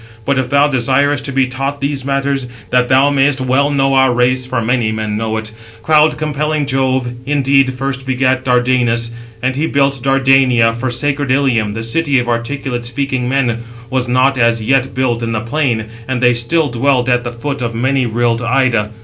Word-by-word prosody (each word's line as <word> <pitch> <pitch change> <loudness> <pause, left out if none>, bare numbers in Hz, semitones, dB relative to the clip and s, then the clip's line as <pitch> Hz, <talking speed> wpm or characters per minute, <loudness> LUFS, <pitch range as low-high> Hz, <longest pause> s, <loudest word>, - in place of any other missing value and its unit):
But 140 -1 +1
if 130 -1 -2
thou 140 +2 +3
desirest 135 +1 +1
to 140 - -3
be 135 -1 +2
taught 135 +2 -4
these 140 -1 -2
matters, 135 -1 -1 0.2
that 125 0 +2
thou 135 +2 +4
mayest 140 0 +2
well 130 +2 +1
know 135 -1 +1
our 130 -1 +4
race 125 +1 +1
(for 130 -1 -2
many 115 -1 0
men 110 -1 -3
know 110 0 -2
it), 110 0 -5 0.3
cloud 155 +1 +3
compelling 150 0 -1
Jove 130 -2 0 0.2
indeed 135 -2 +2
first 135 0 -4
begat 130 0 0
Dardanus. 125 -2 +1
652 - - -12 0.3
And 130 0 0
he 155 +4 -1
built 140 -2 +1
Dardania, 135 -3 +3
for 125 +3 -3
sacred 140 +3 -1
Ilium, 125 -6 +1
the 115 - -4
city 140 +4 0
of 120 -1 0
articulate 120 +1 -3
speaking 125 +1 -2
men, 125 -4 0 0.3
was 130 -1 0
not 130 +2 +2
as 115 -1 +2
yet 135 +2 0
built 125 -3 0
in 115 0 -2
the 110 - -2
plain, 120 -3 -1 0.2
and 130 -1 -2
they 125 0 +4
still 145 +7 +1
dwelt 125 +1 +1
at 125 -1 +1
the 120 - -4
foot 135 +3 -5
of 115 -1 -3
many 130 +2 0
rilled 115 +1 0
Ida. 120 -3 +1
130 Hz, 190 wpm, -15 LUFS, 120-140 Hz, 0.3 s, thou